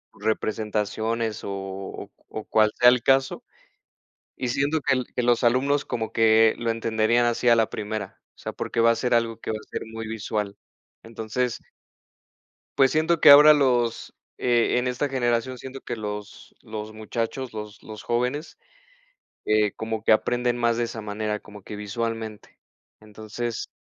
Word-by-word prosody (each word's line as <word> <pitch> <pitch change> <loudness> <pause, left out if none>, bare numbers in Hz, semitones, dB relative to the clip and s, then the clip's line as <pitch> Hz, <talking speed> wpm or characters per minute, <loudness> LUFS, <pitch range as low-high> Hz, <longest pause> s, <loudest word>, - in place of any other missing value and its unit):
Representaciones 110 +1 -2
o - - -5
o 95 0 -7 0.2
o 110 - -6
cual 110 -1 +3
sea 125 - +8
el 125 -1 +3
caso 135 0 +2 0.9
y 130 - -3
siento 140 +6 0
que 130 -2 +1
que - - +1
los 120 +1 +2
alumnos 135 +4 +2
como 110 -1 -3
que 110 0 +4
lo 115 -1 -1
entenderían 115 +1 +1
así 120 +1 -1
a 120 - +7
la 115 -1 +2
primera. 105 -2 -5 0.2
O - - -49
sea, - - -6
porque 115 - -4
va 115 - +5
a - - +1
ser 125 +1 -1
algo 115 -1 +1
que - - -4
va 110 - -2
a - - -23
ser - - -4
muy 115 0 -5
visual. 105 -2 -3 0.5
Entonces 115 +2 -3 1.2
pues 135 -1 +6
siento 160 +1 +1
que - - +8
ahora 150 +2 +10
los, 125 -5 +1 0.2
eh, 120 0 +2
en 125 - -1
esta 125 +3 -1
generación 125 -1 -1
siento 130 +2 -8
que 120 - -5
los 105 -1 -7
los 110 -2 -7
muchachos, 115 +4 -4
los 105 -1 -8
los 110 -1 -9
jóvenes, 125 +6 -2 0.9
eh, 105 -1 +2
como 110 -1 -4
que - - +3
aprenden 120 +2 +2
más 120 -1 +1
de 120 - +1
esa 115 -1 -6
manera, 105 0 -3
como 105 -1 -13
que 105 - -8
visualmente. 110 +1 -5 0.4
Entonces 110 +2 -6
115 Hz, 165 wpm, -25 LUFS, 110-125 Hz, 1.2 s, ahora